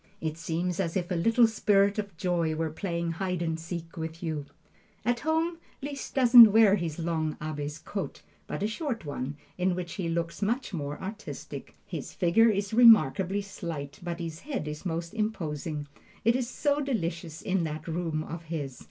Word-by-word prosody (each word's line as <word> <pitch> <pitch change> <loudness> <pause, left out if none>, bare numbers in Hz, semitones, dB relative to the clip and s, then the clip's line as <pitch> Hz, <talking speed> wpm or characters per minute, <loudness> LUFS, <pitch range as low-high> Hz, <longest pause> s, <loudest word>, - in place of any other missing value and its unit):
It 155 -1 -2
seems 170 +2 -2
as 175 -1 0
if 180 0 -3
a - - +1
little 230 +7 +5
spirit 205 -2 +3
of 200 -5 -5
joy 170 -2 0
were 160 0 -1
playing 170 0 -2
hide 180 0 -2
and 160 -1 0
go 160 - -8
seek 165 0 -6
with 160 +1 -5
you. 155 -4 -3 0.6
At 240 0 +2
home 325 +3 0 0.2
Liszt 280 -1 -5
doesn't 240 -4 +10
wear 215 -2 +6
his 165 -6 -3
long 160 -2 -1
Abbe's 150 -1 -4
coat, 200 -2 -5 0.2
but - - -3
a - - +2
short 230 - -3
one, 145 -1 -4 0.2
in 180 0 +2
which 175 -2 -4
he 170 - -1
looks 170 +2 -2
much 230 +3 -1
more 145 -3 -4
artistic. 205 +3 -7
His - - -6
figure 200 +6 +4
is 200 0 -1
remarkably 205 - +6
slight, 155 -7 -6
but 175 -1 -4
his 165 -1 -5
head 270 - -4
is 150 +4 -5
most 170 +1 -3
imposing. 160 -9 -2 0.4
It 230 +1 +5
is 250 -2 -1
so 285 +2 +1
delicious 170 - -2
in 185 -2 +1
that 155 +1 -5
room 165 -2 -1
of 165 +1 -7
his! 145 -6 -4
175 Hz, 180 wpm, -28 LUFS, 160-215 Hz, 0.6 s, doesn't